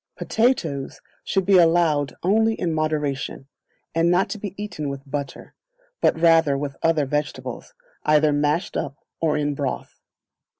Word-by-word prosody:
Potatoes 170 - 0 0.2
should 195 -1 0
be 195 -1 +6
allowed 165 -5 +3
only 220 +4 +3
in 170 -5 -2
moderation, 150 -4 -2 0.5
and 165 +1 +2
not 185 +3 +2
to 215 - -4
be 195 -2 -6
eaten 180 -8 -4
with 140 0 -6
butter, 140 -1 -6 0.5
but - - +2
rather 165 -4 +4
with 140 -1 -4
other 160 -3 +2
vegetables, 150 - -4 0.3
either 150 0 +4
mashed 150 +4 0
up 140 -1 -3 0.2
or 155 -2 +1
in 145 -1 0
broth. 140 -2 -4
155 Hz, 140 wpm, -23 LUFS, 145-175 Hz, 0.5 s, be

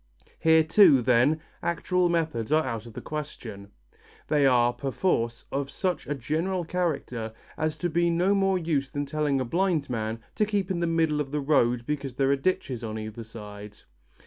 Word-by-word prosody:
Here 160 0 +5
too, 160 - +6
then, 130 +6 +3 0.2
actual 180 +1 +1
methods 160 -9 -1
are 155 +1 +3
out 115 -3 -4
of 115 - -11
the - - -7
question. 115 -10 -7 0.6
They 145 -2 +4
are, 120 -2 +4
perforce, 125 -4 -1
of 140 0 -2
such 180 +1 -2
a 145 - -1
general 165 +7 -2
character 140 -11 -2 0.2
as 155 0 -2
to 175 - -1
be 170 +1 +1
no 175 +4 +2
more 195 -1 +2
use 155 -6 -1
than 145 0 -3
telling 145 -1 0
a 130 - -1
blind 165 -1 0
man 110 -1 -2
to 210 - +1
keep 200 -3 -1
in 180 - -1
the 170 - 0
middle 160 -2 +1
of 140 - -4
the 150 +2 -2
road 125 -5 +2
because 140 -3 -3
there 135 0 +2
are - - +4
ditches 135 -5 -1
on 110 -1 -4
either 110 +1 -6
side. 105 -2 -10
145 Hz, 185 wpm, -27 LUFS, 120-170 Hz, 0.6 s, too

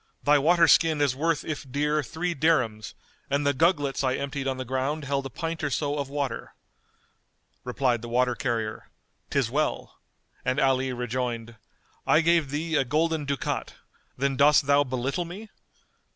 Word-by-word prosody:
Thy 145 0 +5
water 170 +3 +4
skin 160 -1 +4
is 140 -3 +2
worth 160 +2 0
if 145 -4 -5
dear 150 +2 +1
three 160 +6 -3
dirhams, 125 -9 0 0.3
and 140 +1 0
the 140 - +3
gugglets 145 -3 +1
I 130 -1 +1
emptied 140 -1 -4
on 135 -1 -1
the 130 - -5
ground 135 +4 -2
held 140 0 -1
a - - -11
pint 165 +5 -5
or 145 - +1
so 145 +1 -1
of 140 -1 -3
water." 140 -4 -4 1.1
Replied 125 -2 0
the 120 - -7
water 125 +1 +2
carrier 115 -4 -3 0.4
"'Tis - - 0
well," - - -2 0.4
and 130 +3 0
Ali 130 -1 +2
rejoined, 120 -1 -3 0.5
"I 155 - +5
gave 165 -3 +2
thee 160 +4 -3
a 140 - +3
golden 155 +3 0
ducat: 140 -1 -3
why, - - -22 0.4
then 135 0 0
dost 145 +1 +5
thou 140 0 +4
belittle 130 +5 -2
me? 200 +6 -9
140 Hz, 165 wpm, -26 LUFS, 130-155 Hz, 1.1 s, Thy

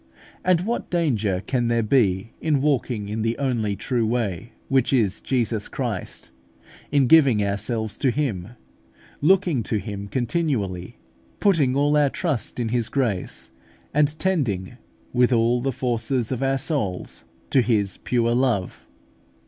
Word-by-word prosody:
And 180 -2 +3
what 230 +6 -3
danger 110 - 0
can 125 -3 0
there 115 -1 +1
be 105 -3 +2
in 150 -3 +2
walking 130 -7 0
in 110 +2 -3
the 115 +1 0
only 115 -7 0
true 120 +4 -1
way, 110 -2 -2
which 135 -3 +2
is 110 -8 +1
Jesus 115 -5 -1
Christ, - - -5 0.6
in 140 -2 +4
giving 130 -8 +5
ourselves 110 +2 -2
to 135 - +2
Him, 120 -10 -1 0.7
looking 175 -4 +3
to 110 0 -1
Him 100 -1 -5
continually, 120 - -2 0.4
putting 155 -10 +3
all 145 +1 +3
our 145 -1 +4
trust 145 - -2
in 115 -2 -1
His 120 -1 0
grace, 115 -10 -2 0.4
and 150 +1 +2
tending, 125 - -1 0.4
with 125 0 +3
all 120 +1 +3
the 135 +2 0
forces 120 0 -1
of 130 - -2
our 135 0 +1
souls, 130 - -2 0.3
to 130 - +5
His 105 -5 +1
pure 120 -1 0
love? 120 -7 0
120 Hz, 140 wpm, -23 LUFS, 110-140 Hz, 0.7 s, giving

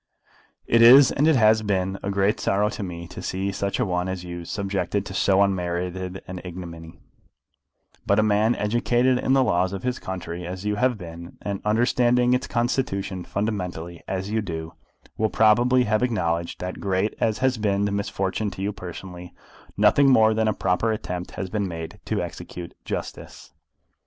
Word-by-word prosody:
It 115 - +3
is, 130 +4 +9
and 145 +3 +2
it 160 - +5
has 110 -2 +5
been, 95 -2 -1
a 100 - -3
great 100 +1 +1
sorrow 105 +2 +1
to 110 - -6
me 85 -3 -6
to - - -8
see 95 +1 -2
such 100 +2 -2
a 125 - +2
one 90 -1 -1
as 95 -1 -4
you 85 -1 -7
subjected 100 +1 -2
to 95 - -7
so 95 +1 +3
unmerited 90 0 -2
an 90 0 -6
ignominy; 85 -2 -9 1.1
but 100 - +3
a 110 - +4
man 110 +2 +3
educated 120 +4 +1
in 130 - +1
the 135 -1 +5
laws 95 -4 +1
of 95 - -5
his 125 0 -2
country, 90 -2 -6
as 90 +3 -6
you 105 - +1
have 125 0 +2
been, 85 -1 -10
and 100 -1 -3
understanding 120 +2 +3
its 125 +1 0
constitution 120 -6 -1
fundamentally, 90 -5 -4
as 95 +1 -3
you 110 0 +1
do, 80 -4 -6 0.5
will 110 0 +2
probably 120 +4 +4
have 110 -1 +1
acknowledged 85 -9 -1
that, 90 0 -5
great 95 +2 0
as 110 -2 +1
has 130 -2 +1
been 100 -1 +1
the 100 - -1
misfortune 100 +1 -2
to 95 - -7
you 105 +1 -1
personally, 90 -2 -9 0.4
nothing 140 -1 +5
more 110 -4 +5
than 110 0 +1
a - - +3
proper 90 +6 +1
attempt 90 -5 -4
has 95 - -4
been 105 -2 -1
made 80 -2 -7
to - - -1
execute 85 -1 -8
justice. - - -6
100 Hz, 180 wpm, -24 LUFS, 90-110 Hz, 1.1 s, is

